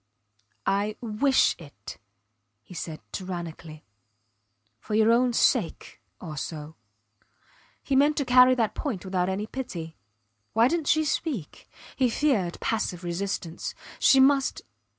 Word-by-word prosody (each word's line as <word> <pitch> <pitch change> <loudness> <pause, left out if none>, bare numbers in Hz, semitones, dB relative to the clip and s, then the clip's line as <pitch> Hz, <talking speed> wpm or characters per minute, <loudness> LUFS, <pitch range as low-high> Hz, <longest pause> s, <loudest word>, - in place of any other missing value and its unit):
I 205 +2 0
wish 240 +4 +2
it, 140 -11 -11 0.6
he - - -13
said, 160 -2 -6
tyrannically. 170 -4 -7 0.9
For 210 - -4
your 220 +1 +5
own 245 +1 +3
sake 230 -4 0 0.2
also.... 155 -1 -6 1.1
He 275 - -1
meant 290 +3 +4
to 280 - 0
carry 250 0 +6
that 225 -4 0
point 225 - -4
without 185 -1 0
any 195 +2 -2
pity. 175 -10 -6 0.6
Why 225 +2 +5
didnt 330 -2 -1
she 315 0 +3
speak? 280 - -3 0.3
He 255 -2 +2
feared 225 -10 0
passive 185 -5 -2
resistance. 175 -1 -4 0.2
She 270 - +6
must. 270 0 +3
210 Hz, 120 wpm, -26 LUFS, 175-260 Hz, 1.1 s, carry